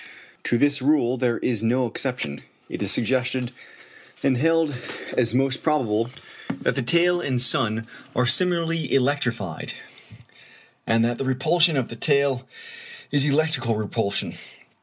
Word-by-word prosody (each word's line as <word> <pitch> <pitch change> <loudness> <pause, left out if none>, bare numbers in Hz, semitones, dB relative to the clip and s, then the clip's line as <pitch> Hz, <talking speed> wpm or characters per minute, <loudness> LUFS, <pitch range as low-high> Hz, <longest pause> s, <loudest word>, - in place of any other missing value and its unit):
To 120 - +2
this 145 +2 +2
rule 130 -3 +3
there 120 -2 0
is 115 -3 -1
no 125 +3 +2
exception. 115 - -3 0.3
It - - -6
is - - 0
suggested, 125 +1 0 0.7
and 135 -2 +3
held 165 +2 +2 0.4
as 115 -1 +1
most 135 0 +1
probable, 120 -7 +1 0.4
that - - -1
the - - -2
tail 175 +7 +3
and 130 -6 -1
sun 115 -2 +2 0.3
are 125 - +2
similarly 165 +3 +1
electrified, 120 - 0 1.1
and 115 0 +3
that 120 0 -1
the 135 - -2
repulsion 155 +5 +3
of 130 - -1
the 115 - -7
tail 140 0 +1 0.6
is 145 -1 +3
electrical 140 -5 +1
repulsion. 105 -1 -2
130 Hz, 135 wpm, -24 LUFS, 115-145 Hz, 1.1 s, rule